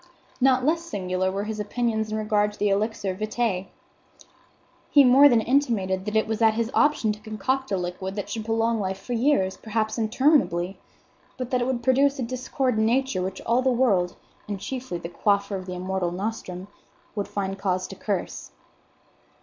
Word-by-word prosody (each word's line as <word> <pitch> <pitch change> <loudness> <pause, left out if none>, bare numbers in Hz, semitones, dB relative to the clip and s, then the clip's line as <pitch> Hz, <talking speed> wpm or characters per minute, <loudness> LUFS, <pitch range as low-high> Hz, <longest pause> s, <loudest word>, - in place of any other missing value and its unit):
Not 260 -1 +4
less 330 +3 +2
singular 185 - -2
were 200 +1 -2
his 215 0 -4
opinions 220 0 -1
in 215 - -1
regard 210 -1 +1
to - - -14
the 205 - +1
elixir 200 -1 0
vitae. 215 -1 -2 1.2
He 285 - +7
more 270 +3 +7
than 235 -3 +4
intimated 215 -8 +1
that 210 0 -3
it 220 - +3
was 220 0 -3
at 220 -1 +5
his 230 +1 -1
option 290 -7 +3
to 210 - -6
concoct 220 +4 -2
a 195 - +1
liquid 180 +2 -4
that 205 - -4
should 220 - -4
prolong 225 0 +1
life 190 -1 -2
for 245 +5 -5
years, 230 -6 +2
perhaps 220 +1 -2
interminably; 220 - +2 0.6
but 255 -1 -5
that 250 -1 +1
it 245 - 0
would 250 -2 -2
produce 275 +2 +3
a 260 - -2
discord 255 0 -1
in 220 - +3
Nature 255 -5 +1
which 190 +1 -4
all 235 +2 +2
the 260 - +2
world, 220 -8 +2 0.3
and 205 -2 -4
chiefly 250 -1 -5
the 170 - -6
quaffer 200 +3 0
of 185 -1 -6
the 180 - -4
immortal 185 0 -2
nostrum, 185 -1 -5 0.5
would 205 -2 -3
find 195 -1 -3
cause 185 -1 -1
to - - -8
curse. - - -4
215 Hz, 185 wpm, -25 LUFS, 190-245 Hz, 1.2 s, He